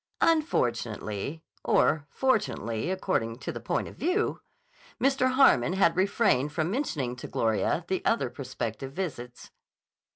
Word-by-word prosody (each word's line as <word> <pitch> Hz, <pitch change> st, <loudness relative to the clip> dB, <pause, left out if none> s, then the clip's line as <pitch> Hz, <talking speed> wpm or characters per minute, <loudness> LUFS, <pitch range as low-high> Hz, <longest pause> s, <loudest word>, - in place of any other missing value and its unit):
Unfortunately, 125 Hz, -, 0 dB, 0.2 s
or 145 Hz, -1 st, +2 dB
fortunately 180 Hz, -, 0 dB
according 185 Hz, -12 st, -1 dB
to 130 Hz, -, -5 dB
the -, -, -6 dB
point -, -, -2 dB
of -, -, -11 dB
view, 365 Hz, +6 st, 0 dB, 0.6 s
Mr. 265 Hz, -1 st, +2 dB
Harmon 185 Hz, -, +5 dB
had 185 Hz, -3 st, +3 dB
refrained 185 Hz, -, +2 dB
from 160 Hz, +2 st, -1 dB
mentioning 150 Hz, -, -2 dB
to 125 Hz, -, -8 dB
Gloria 110 Hz, -, 0 dB
the 190 Hz, 0 st, -1 dB
other 230 Hz, -, +1 dB
prospective 130 Hz, -1 st, -5 dB
visits. 125 Hz, -9 st, -6 dB
155 Hz, 125 wpm, -28 LUFS, -, 0.6 s, Harmon